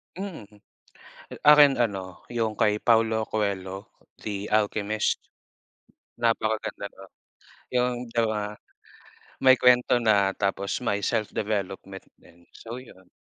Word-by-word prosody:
Mm. 185 Hz, -, -7 dB, 1.0 s
Akin 145 Hz, -2 st, +8 dB
ano, 95 Hz, -6 st, -3 dB
yung 110 Hz, -2 st, -1 dB
kay 105 Hz, 0 st, +2 dB
Paulo 110 Hz, -1 st, +2 dB
Coelho, 100 Hz, -1 st, -3 dB, 0.3 s
The 105 Hz, -1 st, -4 dB
Alchemist. 105 Hz, 0 st, 0 dB, 1.0 s
Napakaganda 110 Hz, -3 st, -1 dB
nun. 95 Hz, -1 st, -14 dB, 0.7 s
Yung 125 Hz, 0 st, +2 dB, 0.2 s
though, 115 Hz, -2 st, +2 dB
ah, 105 Hz, 0 st, -3 dB, 0.9 s
may 130 Hz, -1 st, +6 dB
kwento 125 Hz, 0 st, +5 dB
na 105 Hz, -4 st, +3 dB
tapos 100 Hz, -1 st, -1 dB
may 100 Hz, -1 st, 0 dB
self 105 Hz, +1 st, -1 dB
development 95 Hz, -2 st, -4 dB, 0.2 s
din. 85 Hz, +1 st, -21 dB
So 115 Hz, +1 st, -8 dB
yun. 95 Hz, -7 st, -16 dB
110 Hz, 110 wpm, -26 LUFS, 100-115 Hz, 1.0 s, Akin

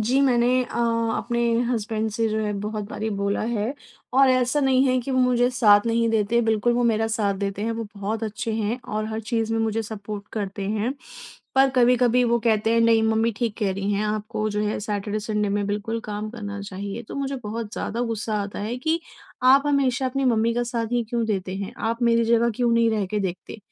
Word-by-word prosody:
जी, 250 Hz, +5 st, +2 dB
मैंने 250 Hz, -1 st, +3 dB
अ, 240 Hz, -, -8 dB, 0.4 s
अपने 235 Hz, 0 st, -2 dB, 0.3 s
हसबैंड 220 Hz, -1 st, -1 dB
से 225 Hz, +1 st, 0 dB
जो 215 Hz, 0 st, -1 dB
है 210 Hz, -, -1 dB
बहुत 210 Hz, 0 st, -3 dB
बारी 220 Hz, +1 st, -3 dB
बोला 200 Hz, 0 st, 0 dB
है 225 Hz, +2 st, -1 dB, 0.4 s
और 270 Hz, -1 st, +7 dB
ऐसा 255 Hz, +3 st, +2 dB
नहीं 265 Hz, -1 st, +3 dB
है 255 Hz, -1 st, +2 dB
कि 250 Hz, -, -6 dB
वो 260 Hz, -, +1 dB
मुझे 250 Hz, -1 st, +3 dB
साथ 210 Hz, -5 st, +5 dB
नहीं 230 Hz, 0 st, +2 dB
देते। 225 Hz, +1 st, +2 dB
बिल्कुल 225 Hz, +1 st, +2 dB
वो 245 Hz, +1 st, +1 dB
मेरा 225 Hz, -1 st, +2 dB
साथ 215 Hz, -3 st, 0 dB
देते 200 Hz, 0 st, -3 dB
हैं, 230 Hz, +1 st, -1 dB
वो 225 Hz, 0 st, -4 dB
बहुत 210 Hz, +3 st, -3 dB
अच्छे 220 Hz, +2 st, -3 dB
हैं 220 Hz, +2 st, -1 dB, 0.2 s
और 215 Hz, 0 st, -1 dB
हर 220 Hz, 0 st, -3 dB
चीज़ 225 Hz, 0 st, -1 dB
में 225 Hz, -, +1 dB
मुझे 225 Hz, 0 st, 0 dB
सपोर्ट 210 Hz, -1 st, -7 dB
करते 200 Hz, -2 st, -4 dB
हैं। 220 Hz, +5 st, -1 dB, 0.6 s
पर 270 Hz, 0 st, +5 dB
कभी-कभी 250 Hz, 0 st, +4 dB
वो 235 Hz, 0 st, +2 dB
कहते 220 Hz, -1 st, +2 dB
हैं 230 Hz, -, +3 dB
नहीं 230 Hz, -1 st, +4 dB
मम्मी 220 Hz, +1 st, +2 dB
ठीक 230 Hz, -2 st, -2 dB
कह 205 Hz, -4 st, 0 dB
रही 195 Hz, +2 st, -2 dB
हैं 205 Hz, +1 st, 0 dB
आपको 215 Hz, 0 st, -2 dB
जो 210 Hz, 0 st, -1 dB
है 210 Hz, 0 st, -1 dB
सैटरडे-संडे 210 Hz, 0 st, -2 dB
में 205 Hz, 0 st, 0 dB
बिल्कुल 210 Hz, +3 st, -2 dB
काम 210 Hz, 0 st, -4 dB
करना 205 Hz, -3 st, -6 dB
चाहिए। 200 Hz, +3 st, -6 dB
तो -, -, -7 dB
मुझे 275 Hz, 0 st, -2 dB
बहुत 220 Hz, 0 st, -5 dB
ज़्यादा 230 Hz, +3 st, -3 dB
गुस्सा 225 Hz, -2 st, -2 dB
आता 200 Hz, 0 st, -6 dB
है 220 Hz, +4 st, -3 dB
कि 320 Hz, +5 st, 0 dB, 0.4 s
आप 265 Hz, +2 st, +6 dB
हमेशा 270 Hz, -2 st, +1 dB
अपनी 270 Hz, +1 st, -1 dB
मम्मी 230 Hz, -2 st, +2 dB
का 240 Hz, -, +1 dB
साथ 235 Hz, -1 st, -2 dB
ही 240 Hz, -1 st, +2 dB
क्यों 235 Hz, -1 st, 0 dB
देते 190 Hz, -3 st, -2 dB
हैं? 200 Hz, +2 st, -5 dB
आप 230 Hz, +2 st, -2 dB
मेरी 235 Hz, -1 st, +3 dB
जगह 235 Hz, +1 st, +3 dB
क्यों 245 Hz, -2 st, +2 dB
नहीं 230 Hz, 0 st, +3 dB
रह 210 Hz, -3 st, 0 dB
के 210 Hz, +3 st, -2 dB
देखते 190 Hz, +3 st, -5 dB
225 Hz, 220 wpm, -24 LUFS, 210-240 Hz, 0.6 s, और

